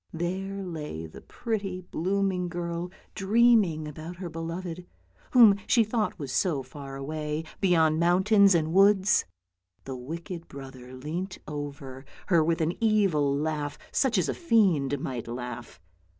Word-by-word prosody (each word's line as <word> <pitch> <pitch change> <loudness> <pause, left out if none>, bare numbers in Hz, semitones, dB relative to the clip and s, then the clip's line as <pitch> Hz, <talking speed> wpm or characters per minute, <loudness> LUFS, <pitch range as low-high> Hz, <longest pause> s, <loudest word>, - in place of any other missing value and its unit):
There 190 +4 -3
lay 150 - -6
the 80 - -11
pretty, 200 -6 -4
blooming 185 +1 -1
girl 170 0 -4 0.2
dream 230 +3 +5
ing 155 -4 -4
about 155 +4 -8
her 175 -1 -7
beloved, 170 +2 -5 0.4
whom 225 -6 +7
she 235 - +5
thought 215 0 -1
was 140 -6 -5
so 140 0 0
far 135 +1 -9
away, 150 +2 -4 0.2
beyond 160 -5 +3
mountains 190 +3 +5
and 160 -1 0
woods. 195 +1 +4 0.6
The 135 - -6
wicked 165 +7 -7
brother 130 -2 -10
leant 170 +8 -5
over 140 -3 -6 0.3
her 170 -4 +5
with 165 +1 0
an 160 +2 +1
evil 195 -10 +3
laugh, 150 -1 -2
such 255 -5 +2
as 185 - +2
a - - 0
fiend 185 - +2
might 125 -4 -5
laugh. 120 0 -7
170 Hz, 140 wpm, -27 LUFS, 145-195 Hz, 0.6 s, whom